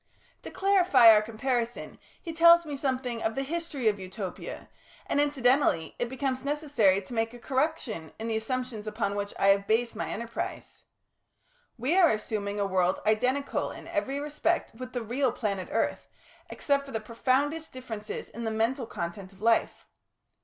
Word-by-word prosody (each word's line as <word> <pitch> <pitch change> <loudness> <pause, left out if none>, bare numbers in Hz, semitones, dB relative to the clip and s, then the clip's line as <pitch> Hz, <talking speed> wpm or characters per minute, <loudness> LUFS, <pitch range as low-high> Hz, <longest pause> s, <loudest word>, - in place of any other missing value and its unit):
To - - -8
clarify 370 - +6
our 210 - +5
comparison 235 +2 -3 0.2
he 330 - -7
tells 340 +1 +7
me 295 -2 -4
something 255 -4 -2
of 220 0 -1
the 270 - -1
history 305 -4 -3
of 205 -2 +2
Utopia, 190 0 -7 0.4
and 285 - +1
incidentally 265 - +2
it 240 - -1
becomes 260 0 -2
necessary 280 -10 +2
to 245 - -9
make 225 +1 -1
a - - -11
correction 260 - -2
in 220 - -6
the 225 -1 -1
assumptions 225 -1 -3
upon 215 -1 -1
which 205 0 -3
I 195 - +4
have 200 0 +3
based 230 +1 +1
my 220 - -3
enterprise. 230 +1 -6 0.9
We 260 +9 +1
are 345 -4 +7
assuming 210 -1 -2
a 200 - +1
world 185 -1 +1
identical 250 +6 +1
in - - -10
every 280 -2 -1
respect 300 +4 -1
with 255 +2 -9
the 245 -2 -2
real 250 +3 0
planet 200 -5 -3
Earth, - - -1 0.4
except 280 -1 0
for - - -9
the 225 - -2
profoundest 270 +8 0
differences 225 -5 -6
in 235 - -8
the 225 - -1
mental 225 +3 0
content 185 0 -5
of 195 - -19
life. 230 0 +2
240 Hz, 165 wpm, -28 LUFS, 215-280 Hz, 0.9 s, tells